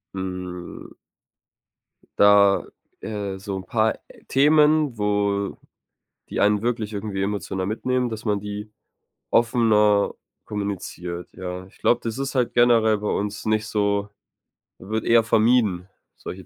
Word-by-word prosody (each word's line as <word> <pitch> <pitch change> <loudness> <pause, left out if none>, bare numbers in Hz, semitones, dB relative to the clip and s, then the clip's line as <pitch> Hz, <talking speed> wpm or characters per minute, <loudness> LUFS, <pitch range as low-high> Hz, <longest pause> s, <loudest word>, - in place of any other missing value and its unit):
hm. 90 -2 -6 1.3
Da, 100 -1 +6 0.4
äh, 100 -3 -4
so 100 0 -5
'n 95 - -7
paar 110 +2 0 0.3
Themen, 150 -1 +4
wo 100 -1 0 0.7
die - - -3
einen 105 0 +3
wirklich 115 -2 -2
irgendwie 100 -1 -4
emotional 100 -2 -3
mitnehmen, 125 +3 -1
dass 110 0 -7
man 105 -2 +1
die 105 +1 -6 0.6
offener 110 -4 +3 0.3
kommuniziert, 90 -4 -5
ja. 90 0 -6
Ich 95 - -21
glaube, 120 - +2
das 115 +1 -4
ist 135 0 -3
halt 125 -2 0
generell 115 -3 +4
bei 105 0 -3
uns 105 +1 -2
nicht 110 0 +1
so 100 -1 0 0.7
wird 110 +3 -3
eher 115 -1 +5
vermieden 110 -5 +2 0.3
solche 95 0 -9
105 Hz, 125 wpm, -23 LUFS, 100-115 Hz, 1.3 s, Da